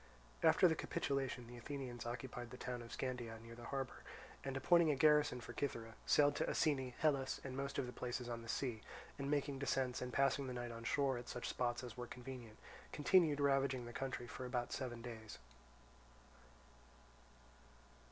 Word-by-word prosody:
After 180 - +7
the 165 - +3
capitulation, 135 -5 -1
the 120 +1 -10
Athenians 125 -2 -5
occupied 120 0 -5
the 125 - -8
town 125 -1 -4
of 115 - -10
Scandea 120 -3 -3
near 115 +1 -10
the 120 0 -9
harbour, 135 0 -3 0.4
and 135 -1 -2
appointing 170 +4 +5
a 150 - +4
garrison 150 -2 +5
for - - -7
Cythera, 115 -5 -3
sailed 145 -1 +5
to - - +1
Asine, 130 -5 +1
Helus, 135 -4 +2
and 130 -1 -5
most 140 +1 -2
of - - +1
the 125 - -6
places 125 0 -3
on 120 -1 -3
the 115 - -10
sea, 120 -5 -1 0.4
and 140 0 -2
making 145 -1 +1
descents 130 -2 0
and 125 0 -3
passing 135 +1 +2
the 125 - -3
night 120 -1 -3
on 115 0 -7
shore 135 -1 +2
at 120 - -9
such 125 - -3
spots 120 0 0
as 120 -2 -7
were 120 0 -4
convenient, 120 -3 -8 0.3
continued 155 -1 +4
ravaging 135 -3 +2
the 120 - -7
country 130 -1 -3
for 125 - -6
about 125 -1 -1
seven 120 -3 -4
days. 110 -3 -7
125 Hz, 180 wpm, -39 LUFS, 120-140 Hz, 0.4 s, After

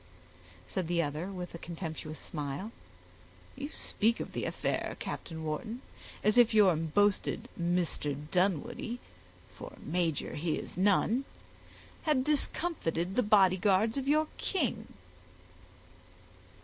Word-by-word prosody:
said 185 -4 -3
the 175 0 +1
other 155 +2 -1
with 180 -3 -6
a 170 - -7
contemptuous 160 -3 -6
smile. 150 +7 -5 0.8
"You 280 +2 -5
speak 230 -5 +1
of - - -5
the - - -2
affair, - - -2
Captain 160 -2 -5
Wharton, 185 - -4 0.4
as 215 +3 +5
if 235 -2 +5
your 195 -5 +6
boasted 185 +6 +1
Mr. 170 -5 0
Dunwoodie, 200 +6 0 0.6
for - - -9
major 165 -2 -1
he 155 +1 -1
is - - -6
none, 205 +7 +3 0.8
had 295 -5 +2
discomfited 285 - 0
the - - +4
bodyguards 200 0 +4
of 275 -1 -2
your 305 +2 +4
king." 245 - -1
190 Hz, 115 wpm, -31 LUFS, 165-230 Hz, 0.8 s, your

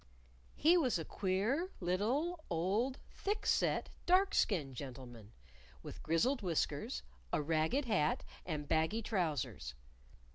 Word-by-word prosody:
He 335 +4 +5
was 260 - +2
a 165 - -4
queer 210 - 0
little 250 - 0
old 200 +10 0
thick 415 +1 -2
set, - - +2 0.2
dark 380 +2 +5
skinned 150 -10 +1
gentleman, 120 -5 -8 0.5
with - - -8
grizzled 240 - +2
whiskers, 160 - -1 0.3
a - - +2
ragged 160 - +1
hat 190 -10 +1 0.2
and 150 -4 -4
baggy 160 +10 +1
trousers. 155 - -2
185 Hz, 115 wpm, -36 LUFS, -, 0.5 s, He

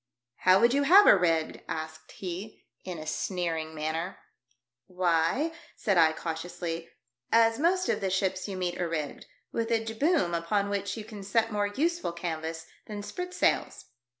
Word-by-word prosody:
" 120 0 -62
How 185 +1 +8
would 235 +1 +4
you 280 - +3
have 380 +8 +8
her - - +9
rigged?" 165 -4 +1
asked 160 0 -6
he, 190 +3 -7 0.2
in 180 -2 -5
a 155 - -7
sneering 165 -2 -2
manner. 160 +4 -3 0.4
" 120 0 -55 0.2
Why," 180 - +1 0.2
said 200 -4 0
I, 160 -2 +6
cautiously, 165 +1 -5 0.2
" 120 0 -48
as 225 +1 +4
most 365 +4 +2
of - - 0
the 195 - 0
ships 190 0 0
you 195 -2 -5
meet 180 -1 -2
are 175 - -1
rigged 155 -3 -4
— - - -49
with 230 0 -1
a 225 -1 +1
jib 225 0 -6
boom 300 - +2
upon 200 +5 0
which 200 0 -2
you 220 - -5
can 210 -2 -9
set 225 +3 +1
more 205 -1 +1
useful 325 - -1
canvas 160 -1 -4 0.2
than 205 -1 -6
spritsails." 360 - -1
185 Hz, 180 wpm, -28 LUFS, 165-225 Hz, 0.4 s, her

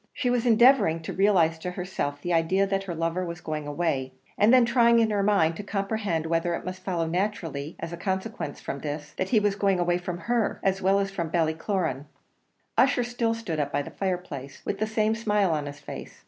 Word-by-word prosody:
She 260 -4 0
was 245 0 +1
endeavouring 225 -8 +5
to - - -5
realize 180 -5 +3
to 180 - -4
herself 180 -6 -4
the 175 - -1
idea 170 +4 +2
that 195 0 -1
her 175 -3 -4
lover 165 +2 -1
was 170 -1 -5
going 155 -3 -4
away, 145 -4 -1 0.2
and 210 +3 +4
then 250 -2 +6
trying 235 -1 +4
in 225 -1 +3
her 205 -1 +1
mind 195 -5 +3
to 205 - -5
comprehend 195 -5 -2
whether 165 +1 0
it - - -7
must 185 0 -6
follow 175 -3 -1
naturally, 165 -4 -2
as 165 0 -5
a - - -5
consequence 190 -3 -3
from 140 - -5
this, 145 0 -5
that 190 - -1
he 225 - +4
was 205 -1 +1
going 195 -2 +1
away 175 0 +1
from 175 -1 -4
her, 235 +1 0
as 195 0 +1
well 195 +1 +3
as 195 -1 0
from 170 -4 -3
Ballycloran. 160 -3 -1 0.7
Ussher 255 -1 +4
still 235 -1 -1
stood 185 -9 -4
up 145 -1 -1
by 145 - 0
the - - -9
fireplace, 175 -8 -4
with 195 - -2
the 215 - 0
same 220 0 +1
smile 210 -4 +1
on 150 -2 -1
his 145 0 -8
face. 145 - -9
185 Hz, 215 wpm, -26 LUFS, 165-210 Hz, 0.7 s, then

